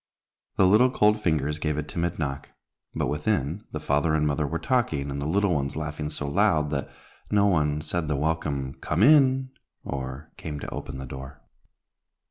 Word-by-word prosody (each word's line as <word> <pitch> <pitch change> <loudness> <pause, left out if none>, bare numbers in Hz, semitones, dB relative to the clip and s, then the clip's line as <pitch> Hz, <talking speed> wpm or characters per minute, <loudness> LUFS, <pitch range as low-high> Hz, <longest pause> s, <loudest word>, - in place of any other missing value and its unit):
The 95 - +5
little 110 +7 +6
cold 105 -3 +3
fingers 75 -5 0
gave 75 -1 -1
a 75 - -1
timid 85 +3 -3
knock, 70 -3 -3 0.5
but, - - 0
within, 75 +3 -1
the 75 - -4
father 75 +1 +1
and 75 -1 +2
mother 75 0 0
were 85 +4 -2
talking, 80 - 0
and 70 0 -4
the 70 - -2
little 100 +3 +2
ones 70 -2 -1
laughing 75 0 -4
so 75 -1 -4
loud, 75 +1 +2
that 70 -2 -2 0.4
no 100 -1 +3
one 75 -6 +2
said 80 +1 -2
the 75 - 0
welcome 70 -3 -1
"Come 85 +6 +1
in," 135 -2 +5 0.3
or 65 +2 -6
came 75 -2 -5
to - - -6
open - - -6
the 65 - -6
door. 65 +2 -9
75 Hz, 180 wpm, -26 LUFS, 70-85 Hz, 0.5 s, little